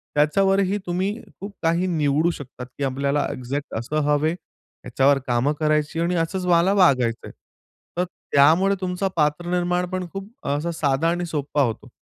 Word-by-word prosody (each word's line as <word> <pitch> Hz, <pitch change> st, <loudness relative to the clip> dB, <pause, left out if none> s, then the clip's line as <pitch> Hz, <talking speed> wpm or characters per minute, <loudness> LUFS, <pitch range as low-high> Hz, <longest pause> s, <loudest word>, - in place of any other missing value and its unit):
त्याच्यावर 195 Hz, +7 st, +3 dB
ही 195 Hz, +1 st, +1 dB
तुम्ही 185 Hz, +3 st, -1 dB, 0.3 s
खूप 200 Hz, +1 st, -7 dB
काही 170 Hz, +3 st, +2 dB
निवडू 155 Hz, -1 st, +1 dB
शकतात 130 Hz, -5 st, -9 dB
की 145 Hz, -, -3 dB
आपल्याला 140 Hz, +2 st, 0 dB
एक्झॅक्ट 135 Hz, +3 st, -5 dB
असं 135 Hz, +7 st, -3 dB
हवं 145 Hz, +1 st, +2 dB
आहे, 165 Hz, -, 0 dB, 0.5 s
याच्यावर 135 Hz, +1 st, +3 dB
कामं 125 Hz, +4 st, +1 dB
करायची 155 Hz, +1 st, 0 dB
आणि 170 Hz, +1 st, 0 dB
असंच 175 Hz, +3 st, -1 dB
मला 175 Hz, +3 st, +4 dB
वागायचं 130 Hz, -, +2 dB
आहे. -, -, -9 dB, 0.7 s
तर 180 Hz, -, +2 dB, 0.3 s
त्यामुळे 165 Hz, +8 st, +5 dB
तुमचा 185 Hz, +1 st, -1 dB
पात्र 150 Hz, +1 st, +1 dB
निर्माणपण 180 Hz, +1 st, -1 dB
खूप 195 Hz, +1 st, -6 dB, 0.2 s
असा 150 Hz, +4 st, -1 dB
साधा 150 Hz, 0 st, +1 dB
आणि 175 Hz, +1 st, -1 dB
सोप्प 150 Hz, -3 st, -4 dB
होतो. 115 Hz, -6 st, 0 dB
160 Hz, 160 wpm, -23 LUFS, 145-180 Hz, 0.7 s, त्यामुळे